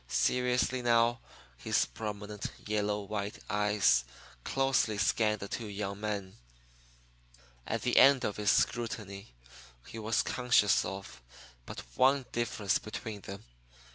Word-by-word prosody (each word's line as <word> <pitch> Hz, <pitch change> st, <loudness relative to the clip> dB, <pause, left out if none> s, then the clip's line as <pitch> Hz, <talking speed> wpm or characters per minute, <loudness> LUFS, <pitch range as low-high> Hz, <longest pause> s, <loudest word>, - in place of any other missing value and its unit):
Seriously, 125 Hz, -, +1 dB
now, 120 Hz, 0 st, +3 dB, 0.4 s
his -, -, +1 dB
prominent, 105 Hz, -1 st, -6 dB, 0.2 s
yellow 105 Hz, 0 st, 0 dB
white 100 Hz, 0 st, -4 dB
eyes 105 Hz, -12 st, +3 dB, 0.4 s
closely 135 Hz, -5 st, +1 dB
scanned 105 Hz, +1 st, +1 dB
the 100 Hz, -, -4 dB
two 115 Hz, +2 st, -5 dB
young 100 Hz, -1 st, -4 dB
men. 100 Hz, -, -4 dB, 1.3 s
At -, -, -2 dB
the -, -, +1 dB
end 135 Hz, -2 st, +7 dB
of 105 Hz, -, -2 dB
his 105 Hz, -1 st, +1 dB
scrutiny 105 Hz, -, -1 dB, 0.5 s
he 115 Hz, -, -8 dB
was 110 Hz, +1 st, +1 dB
conscious 125 Hz, -5 st, +3 dB
of 95 Hz, -10 st, -7 dB, 0.5 s
but -, -, -7 dB
one 135 Hz, -, +3 dB
difference 115 Hz, -4 st, 0 dB
between 110 Hz, -1 st, -7 dB
them. 100 Hz, +1 st, -8 dB
105 Hz, 120 wpm, -31 LUFS, 100-115 Hz, 1.3 s, end